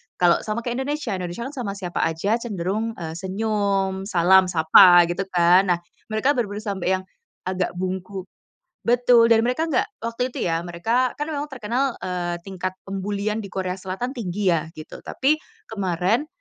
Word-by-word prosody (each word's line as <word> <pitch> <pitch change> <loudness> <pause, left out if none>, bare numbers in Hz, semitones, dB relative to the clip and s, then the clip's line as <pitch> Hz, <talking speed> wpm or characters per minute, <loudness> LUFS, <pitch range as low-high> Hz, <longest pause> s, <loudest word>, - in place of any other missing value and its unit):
kalau 175 -1 +4
sama 215 +2 -2
kek 240 - -2
Indonesia, 290 -2 -2
Indonesia 185 +3 -4
kan 270 - -5
sama 240 -8 -4
siapa 180 -3 -4
aja 180 +8 0
cenderung, 215 0 -3
eee, 165 -3 -6
senyum, 195 -1 -1
salam, 190 -1 +5
sapa 175 +1 +7
gitu 185 +3 -2
kan. 180 +2 +5
Nah, 170 - -3 0.3
mereka 220 +6 +1
bener-bener 205 -3 -2
sampai 195 -4 -3
yang 185 - -5 0.5
agak 185 -1 -1
bungkuk 185 +1 -4 0.5
betul, 240 -1 +5
dan 225 0 +5
mereka 315 +7 0
nggak 255 - +2 0.2
waktu 235 +2 -2
itu - - -3
ya, 165 0 0
mereka 230 +9 0
kan 295 +2 -4
memang 295 0 -3
terkenal, 255 0 -1
eee, 180 -2 -2
tingkat 185 -1 -4
pembulian 200 +2 -3
di 210 - -5
Korea 185 -1 -3
Selatan 190 +7 -4
tinggi 195 -2 0
ya, 165 -2 +1
gitu. 155 0 -10
Tapi 300 +4 +1 0.3
kemarin 195 - 0
195 Hz, 165 wpm, -23 LUFS, 180-230 Hz, 0.5 s, sapa